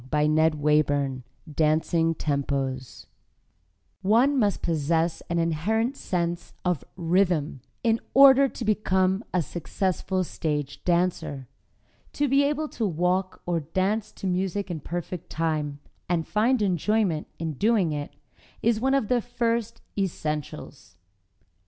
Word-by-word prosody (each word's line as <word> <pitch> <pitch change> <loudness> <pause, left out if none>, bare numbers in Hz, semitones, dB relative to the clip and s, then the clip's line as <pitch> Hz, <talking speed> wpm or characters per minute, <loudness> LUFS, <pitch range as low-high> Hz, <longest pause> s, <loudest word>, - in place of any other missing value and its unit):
] - - -15 1.5
DANCING 160 +2 +2
TEMPOS 135 -3 -2 1.0
One 250 +8 +3
must 205 -4 +1
possess 165 +1 0
an 170 - 0
inherent 200 - 0
sense 175 -6 -3
of 180 -6 0
rhythm 170 -5 +1 0.2
in 230 -1 +2 0.2
order 275 0 +8
to 240 - -6
become 190 -1 +1
a 180 -2 +1
successful 185 +3 -2
stage 150 -4 -3
dancer. 170 -7 0 0.7
To 290 - +1
be 275 +1 +4
able 300 +2 0
to 225 -3 -2
walk 180 +2 -1
or 175 -1 0
dance 195 +7 -1
to - - -8
music 190 +1 -1
in 165 - -3
perfect 175 +2 -5
time, 155 -3 -1 0.3
and 170 -2 +1
find 225 +2 +2
enjoyment 190 -2 +1
in 160 -1 -3
doing 205 - +2
it, 145 -1 -5 0.5
is 230 -1 +3
one 265 +2 +2
of 270 -6 +1
the 245 +1 +2
first 230 -1 -2
essentials. 155 - -4
180 Hz, 120 wpm, -26 LUFS, 160-220 Hz, 1.5 s, order